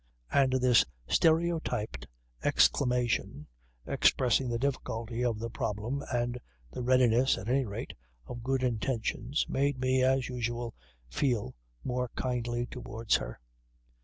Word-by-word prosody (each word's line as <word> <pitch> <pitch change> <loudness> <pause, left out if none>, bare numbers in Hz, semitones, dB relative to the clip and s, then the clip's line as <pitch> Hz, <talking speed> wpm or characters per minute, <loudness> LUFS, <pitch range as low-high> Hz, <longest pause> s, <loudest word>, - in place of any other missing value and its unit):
And 135 -2 +3
this 125 -3 +5 0.2
stereotyped 160 - +1 0.4
exclamation, 125 -3 +2 0.4
expressing 130 0 +2
the 120 - 0
difficulty 120 -3 -2
of 120 -3 +1
the 115 +1 -5
problem 115 +7 -3
and 120 0 -1 0.3
the - - -5
readiness 125 0 +4
(at 95 - -7
any 130 +2 +2
rate) 100 -2 -6 0.3
of 120 - -7
good 130 +2 0
intentions, 120 +2 -1
made 140 0 0
me, 130 0 +2
as 130 0 +2
usual, 120 -2 -3 0.3
feel 105 - -1 0.3
more 125 0 -2
kindly 120 -1 -1
towards 115 -3 -1
her. - - -7
125 Hz, 120 wpm, -30 LUFS, 115-130 Hz, 0.4 s, this